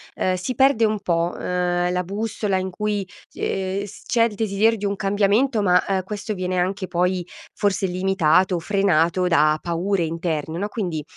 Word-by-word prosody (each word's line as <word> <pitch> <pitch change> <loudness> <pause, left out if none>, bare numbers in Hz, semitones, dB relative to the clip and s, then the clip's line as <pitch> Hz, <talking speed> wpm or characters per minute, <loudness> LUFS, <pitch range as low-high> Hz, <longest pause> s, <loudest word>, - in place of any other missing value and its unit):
ehm, 185 0 0
si 185 +8 -4
perde 265 -2 +4
un 215 -1 0
po', 170 0 0
ehm, 180 0 0
la 180 0 0
bussola, 205 +1 -2
in 185 0 -2
cui 205 +1 -2
s - - -20
ehm, 195 +1 -2 0.2
c'è 230 -2 +2
il 230 -3 0
desiderio 220 +2 +2
di 205 - -4
un 200 0 0
cambiamento, 205 +5 +2
ma 180 -2 +4
eh, 190 -1 0
questo 210 +2 -5
viene 185 -1 -2
anche 185 +1 -1
poi 180 0 0 0.3
forse 200 -1 0
limitato 185 -1 +2
o 170 - -1
frenato 180 -2 +2
da 155 -2 +3
paure 175 +2 -1
interne, 160 -1 -3
no, 200 +3 -2
quindi, 175 -9 -3
190 Hz, 175 wpm, -22 LUFS, 180-205 Hz, 0.3 s, perde